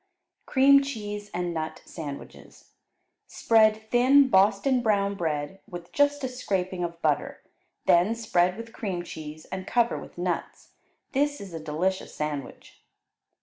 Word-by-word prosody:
Cream 275 +1 +6
Cheese 210 -6 -5
and 175 -1 -2
Nut 160 -1 -4
Sandwiches 145 -4 -9 0.6
Spread 220 -1 +3
thin 265 +3 +5
Boston 210 +5 +3
brown 200 -3 +1
bread 160 0 -3
with 175 -1 -9
just 285 0 +2
a - - +1
scraping 190 -7 -2
of 170 -1 -5
butter, 150 -2 0 0.4
then 180 +7 +4
spread 185 -5 +1
with 230 0 -9
cream 185 -5 -3
cheese 155 -2 -9
and 190 0 -5
cover 235 -1 +1
with - - -12
nuts; 175 -1 -4 0.4
this 290 +1 0
is 195 -3 -9
a 165 - -5
delicious 160 +5 -2
sandwich. 150 -3 -6
195 Hz, 135 wpm, -26 LUFS, 175-235 Hz, 0.6 s, Cream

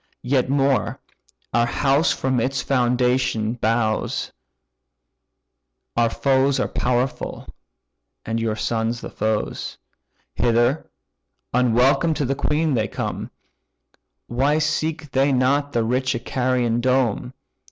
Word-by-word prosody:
Yet 130 0 +1
more; 135 -1 +1 0.5
our 120 0 +3
house 140 +5 +2
from 130 -1 0
its 130 +2 -1
foundation 125 -3 +1
bows, 115 -2 -1 1.6
Our 115 -1 +3
foes 135 +2 +2
are - - +1
powerful, 125 +1 -2 0.8
and 115 +1 -2
your 115 -1 -1
sons 115 +1 -1
the - - -7
foes; 110 0 -2 0.6
Hither, 120 +4 +1 0.6
unwelcome 125 +6 +3
to 145 - -1
the 135 - 0
queen, 150 +2 0
they 110 -4 +1
come; - - -4 1.0
Why 135 +5 +1
seek 155 -1 -1
they 135 +1 +2
not 140 +3 +2
the 115 -3 +1
rich 130 +3 0
Icarian 120 -1 0
dome? 125 -1 0
125 Hz, 110 wpm, -22 LUFS, 120-135 Hz, 1.6 s, our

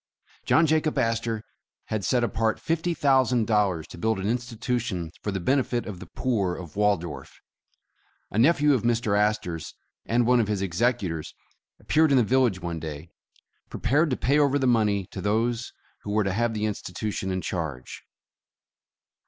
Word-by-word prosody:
John 165 - +5
Jacob 155 0 +1
Astor 115 -1 0 0.5
had 110 -2 -2
set 120 +6 +1
apart 115 -1 0
fifty 165 +1 -1
thousand 130 -5 +3
dollars 100 -7 +1
to - - -10
build 110 +1 0
an 95 - -2
institution 115 -6 -2
for - - -3
the 95 - -2
benefit 125 +3 0
of 100 -4 -7
the - - -10
poor 100 -9 -1
of 85 -4 -9
Waldorf. 100 -7 -1 0.9
A 105 - -1
nephew 150 +2 +4
of 130 - +1
Mr. 115 -3 +1
Astor 105 -5 0
's 80 - -10 0.3
and 120 +1 +2
one 125 +1 +4
of 110 - +1
his 100 -2 -1
executors, 95 -4 -1 0.4
appeared 160 0 +3
in 140 - +4
the 125 - +5
village 120 -4 +2
one 85 -2 -4
day, 80 +1 -7 0.6
prepared 150 +6 +1
to 130 - -1
pay 140 +3 +2
over 145 -1 +3
the 135 - 0
money 105 -5 +2
to - - -6
those 115 +3 0 0.3
who - - -8
were 105 +1 +2
to 95 -1 -1
have 115 +2 0
the 105 0 -1
institution 100 -1 -3
in 95 0 -1
charge. 80 -10 -5
110 Hz, 170 wpm, -26 LUFS, 95-125 Hz, 0.9 s, John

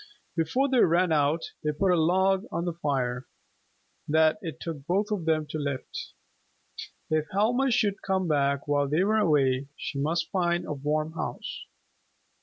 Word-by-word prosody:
Before 175 - +1
they 260 -2 +2
ran 175 -2 +4
out, 150 +1 +1
they 150 - +1
put 185 +5 +1
a - - +4
log 190 +4 +2
on 170 - -2
the 175 - -1
fire 130 -6 -2 0.8
that 160 +4 +3
it 165 -5 -6
took 160 -5 -6
both 205 +4 0
of 195 -6 -2
them 155 -1 +1
to 155 - -3
lift. 140 -3 -5 1.0
If 155 0 +1
Helma 245 +7 +2
should 210 -4 +1
come 190 -2 0
back 140 -2 +1
while 145 -1 +2
they 155 +6 +2
were 215 +2 +2
away, 140 -7 +2
she 140 - -4
must 165 +4 -1
find 175 -2 0
a - - -3
warm 150 +2 -1
house. 165 - -5
165 Hz, 165 wpm, -27 LUFS, 145-190 Hz, 1.0 s, ran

